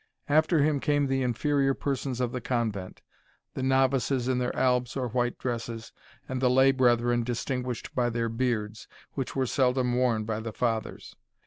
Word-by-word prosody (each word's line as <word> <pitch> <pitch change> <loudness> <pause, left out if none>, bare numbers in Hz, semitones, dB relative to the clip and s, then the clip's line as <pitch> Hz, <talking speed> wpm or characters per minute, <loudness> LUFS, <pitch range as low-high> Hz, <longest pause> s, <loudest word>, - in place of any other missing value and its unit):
After 155 +1 +3
him 150 -1 +2
came 145 0 +1
the 135 0 0
inferior 135 +2 +1
persons 135 -2 -3
of 125 -2 0
the 125 - -4
convent; 110 -7 -3 0.5
the - - -4
novices 130 -1 +2
in 130 -1 +1
their 125 0 -2
albs 125 0 +1
or 125 -2 -2
white 120 +1 -1
dresses, 115 -2 -4 0.4
and 130 -1 -3
the 125 - +4
lay 130 +2 +5
brethren 120 -2 +2
distinguished 125 0 -3
by 120 -1 +1
their 115 0 -1
beards, 115 -2 -2 0.3
which 135 -2 -4
were 135 -1 +1
seldom 125 -1 +1
worn 120 -3 +1
by 110 0 -2
the 110 -1 -6
Fathers. 115 -2 -3
125 Hz, 170 wpm, -27 LUFS, 120-135 Hz, 0.5 s, lay